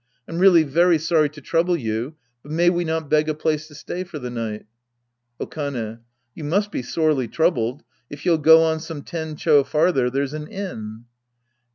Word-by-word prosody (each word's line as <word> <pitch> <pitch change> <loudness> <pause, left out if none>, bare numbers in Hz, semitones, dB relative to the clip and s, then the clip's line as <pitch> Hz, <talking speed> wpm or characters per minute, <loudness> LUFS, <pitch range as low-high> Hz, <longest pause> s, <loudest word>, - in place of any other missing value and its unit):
I'm 165 - -4
really 180 -3 +6
very 170 +4 +3
sorry 155 -1 +2
to 150 +1 -13
trouble 170 +5 +1
you, 115 +3 -3 0.3
but 145 - -12
may 170 +2 +3
we 175 0 0
not 160 -2 -2
beg 155 +1 +2
a 155 - -1
place 155 0 -1
to 150 - -15
stay 180 +5 -5
for 175 -4 -9
the 125 -3 -6
night? 115 -3 -5 0.7
Okane. 120 -7 -4 0.3
You 160 - -9
must 200 +8 0
be - - -3
sorely 145 0 0
troubled; 145 -5 0 0.3
if 145 0 -10
you'll 165 -3 +3
go 160 +2 +7
on 160 0 +1
some 160 -2 -7
ten 160 -3 -5
cho 150 -2 +4
farther, 140 -2 +2
there's 140 +2 -2
an 155 0 -6
inn. 115 - -7
155 Hz, 185 wpm, -22 LUFS, 135-165 Hz, 0.7 s, go